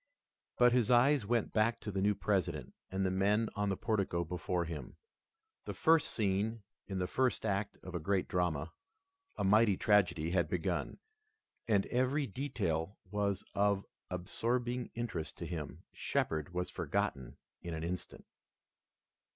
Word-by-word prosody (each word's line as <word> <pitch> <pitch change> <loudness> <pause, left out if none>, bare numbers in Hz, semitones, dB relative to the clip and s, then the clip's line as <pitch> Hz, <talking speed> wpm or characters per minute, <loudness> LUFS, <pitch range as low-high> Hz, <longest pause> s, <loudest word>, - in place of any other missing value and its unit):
But 125 0 +6
his 120 -4 +3
eyes 125 -1 +5
went 120 -1 +1
back 115 +2 +2
to 105 - -4
the 95 -1 -1
new 105 +1 +3
President 85 -11 -1 0.2
and 95 +1 -1
the 95 - +1
men 105 +4 +2
on 105 -1 0
the 95 - -1
portico 100 -6 0
before 90 +1 -1
him. 80 -3 -7 0.7
The - - -5
first 160 -1 +4
scene 105 +1 0 0.2
in 95 - -3
the 90 - 0
first 130 +4 0
act 100 0 -1
of 90 - -8
a 85 - -1
great 95 +4 0
drama, 85 -4 0 0.7
a - - -1
mighty 105 0 +5
tragedy, 85 -6 +3
had 85 -2 +2
begun, 90 0 -1 0.7
and 100 -3 +3
every 130 +4 +1
detail 100 - -2
was 100 -1 0
of 100 0 +2 0.2
absorbing 120 +7 -1
interest 115 -9 -4
to - - -5
him. 80 -4 -5
Shepard 80 +2 -1
was 90 0 -2
forgotten 65 -3 -2 0.2
in 85 -1 -4
an 80 - -4
instant. 90 +2 -5
100 Hz, 150 wpm, -34 LUFS, 90-115 Hz, 0.7 s, But